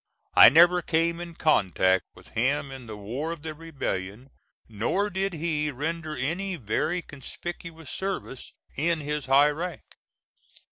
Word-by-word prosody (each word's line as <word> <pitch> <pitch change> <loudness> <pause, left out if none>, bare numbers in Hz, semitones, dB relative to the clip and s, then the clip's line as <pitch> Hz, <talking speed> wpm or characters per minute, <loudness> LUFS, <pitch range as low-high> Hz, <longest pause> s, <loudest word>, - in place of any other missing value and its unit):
I - - +10
never 175 +5 +6
came 170 0 +1
in 170 -1 -7
contact 95 - +2
with - - -16
him 135 +4 0
in 130 -3 -9
the 110 -1 -7
war 125 +11 -4
of 165 -3 -7
the 160 -1 -4
Rebellion, 130 -7 -5 0.4
nor 120 - -1
did 195 +1 -1
he 155 -2 -1
render 155 +3 -4
any 175 +9 -2
very 165 - -1
conspicuous 165 +2 -8
service 190 -9 -4 0.2
in 165 +3 +1
his 150 -2 -3
high 140 +3 +5
rank. 170 +3 -5
155 Hz, 140 wpm, -26 LUFS, 130-170 Hz, 0.4 s, I